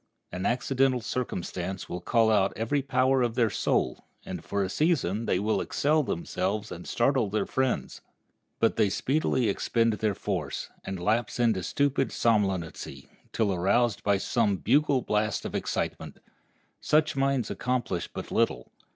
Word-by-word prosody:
An 90 +1 -2
accidental 130 +1 +1
circumstance 95 -6 -4
will 90 - -5
call 115 +3 +3
out 100 -2 +3
every 115 +6 0
power 130 0 +2
of 120 -2 0
their 115 -4 +2
soul, - - 0 0.2
and - - -6
for 100 0 -1
a - - -1
season 115 - 0
they - - +2
will 105 +3 0
excel 155 +2 +1
themselves 95 - -2
and 85 - -8
startle 120 -3 +1
their 105 +2 0
friends. 130 - -1 0.6
But - - +2
they 105 - +3
speedily 130 +1 +1
expend 115 +3 +1
their 105 -1 -1
force, 90 -9 -3
and 95 -1 -5
lapse 110 +7 0
into 115 -6 +2
stupid 135 - 0
somnolency, 95 -8 -1 0.2
till 105 -4 +1
aroused 100 +6 +2
by 100 -1 +3
some 100 0 +1
bugle 140 -1 +2
blast 105 0 0
of - - -5
excitement. - - -3 0.6
Such 155 -1 +2
minds 135 -2 +1
accomplish 125 -8 -2
but - - -8
little. - - 0
110 Hz, 150 wpm, -27 LUFS, 95-130 Hz, 0.6 s, call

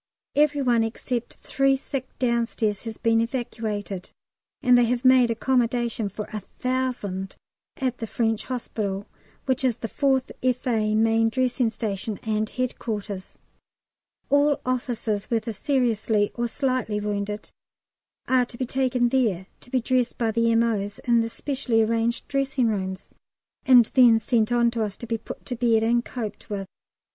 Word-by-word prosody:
Every 290 -1 +3
one 240 -3 +3
except 235 +1 -3
three 275 0 +2
sick 265 -1 -5
downstairs 235 -4 0
has 225 -1 -5
been 225 0 +2
evacuated, 220 -6 -3 0.5
and 250 -1 +6
they 245 -1 +5
have 245 +2 -1
made 255 -2 +6
accommodation 235 -2 0
for 210 +2 -6
1000 215 -3 -3 0.4
at 255 -2 -2
the 225 - -4
French 225 -1 -1
Hospital, 205 -5 -3 0.4
which 260 -1 +1
is 245 -3 +2
the 225 - -4
4th 265 +2 +1
F.A. 240 -4 +1
main 225 +1 +3
dressing 250 0 +1
station, 210 -2 -3
and 215 -1 -1
headquarters. 210 -6 -4 0.9
All 285 0 +4
officers, 240 -5 -2
whether 230 -1 -1
seriously 220 -4 +1
or 240 0 -1
slightly 255 -4 -1
wounded, 210 0 -3 0.8
are 255 -1 +3
to 235 - -12
be 255 - -1
taken 250 -1 +1
there 220 -8 +1
to - - -15
be 255 - +1
dressed 250 0 0
by 230 -3 +1
the 230 +1 +2
M.O.'s 225 -3 +1
in 235 -2 +3
the 230 - -2
specially 245 -3 0
arranged 230 +2 0
dressing 270 -3 +1
rooms, 190 -2 -3 0.6
and 250 -3 +8
then 245 -4 +7
sent 225 -1 +1
on 235 -1 +3
to 230 -1 -2
us 205 -2 -4
to - - -7
be 230 -1 -2
put - - -9
to 250 - -4
bed 230 -2 +2
and 235 +1 +2
coped 225 -5 -6
with. 200 -2 -3
235 Hz, 150 wpm, -25 LUFS, 215-255 Hz, 0.9 s, and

